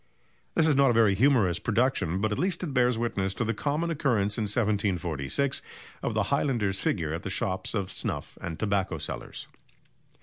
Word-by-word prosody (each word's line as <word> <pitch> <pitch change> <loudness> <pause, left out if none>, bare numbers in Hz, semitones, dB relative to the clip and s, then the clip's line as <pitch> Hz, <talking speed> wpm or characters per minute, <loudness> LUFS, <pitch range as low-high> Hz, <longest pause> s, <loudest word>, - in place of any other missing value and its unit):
This - - +4
is 150 - +4
not 140 -1 +5
a - - +3
very 110 -3 +5
humorous 110 -5 +3
production, 110 -6 +1
but 110 0 +1
at 105 - -1
least 185 0 0
it 155 -6 -3
bears 125 -2 +3
witness 100 -5 -1
to 120 - -1
the 115 - 0
common 150 +6 -1
occurrence 115 -10 +1
in 110 - -1
1746 100 - 0 0.4
of - - -2
the - - +2
highlander's 105 -8 +1
figure 80 -6 -1
at 85 - -3
the 100 - -5
shops 95 +2 -2
of 95 -2 -2
snuff - - -4
and 85 -4 -5
tobacco 100 -3 0
sellers. - - -6
105 Hz, 180 wpm, -28 LUFS, 95-130 Hz, 0.4 s, not